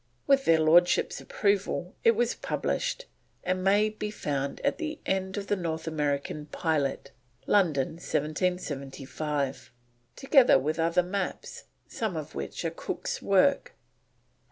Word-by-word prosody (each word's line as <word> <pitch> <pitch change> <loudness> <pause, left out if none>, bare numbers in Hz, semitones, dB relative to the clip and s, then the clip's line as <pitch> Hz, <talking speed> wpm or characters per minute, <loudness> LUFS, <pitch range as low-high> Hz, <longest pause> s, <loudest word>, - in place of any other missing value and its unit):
With 275 -1 +3
their 165 -1 +5
Lordships' 170 +3 +4
approval 200 -3 -1
it 230 - +5
was 240 +1 +1
published, - - -2 0.4
and 185 +1 -1
may 205 +3 +4
be 210 0 -5
found 140 -8 -3
at - - 0
the 310 -2 -3
end 190 0 -1
of 200 - -3
The 205 - 0
North 165 -3 -3
American 150 -1 -2
Pilot, 150 -4 -1 0.3
London, 160 -10 +2
1775, 145 -5 -3 0.4
together 270 - +5
with 155 +5 -2
other 170 +2 +2
maps, 190 +1 -4 0.2
some 215 -7 -3
of 155 -2 -6
which 70 0 -5
are - - 0
Cook's - - -4
work. - - +2
175 Hz, 130 wpm, -28 LUFS, 150-205 Hz, 0.4 s, their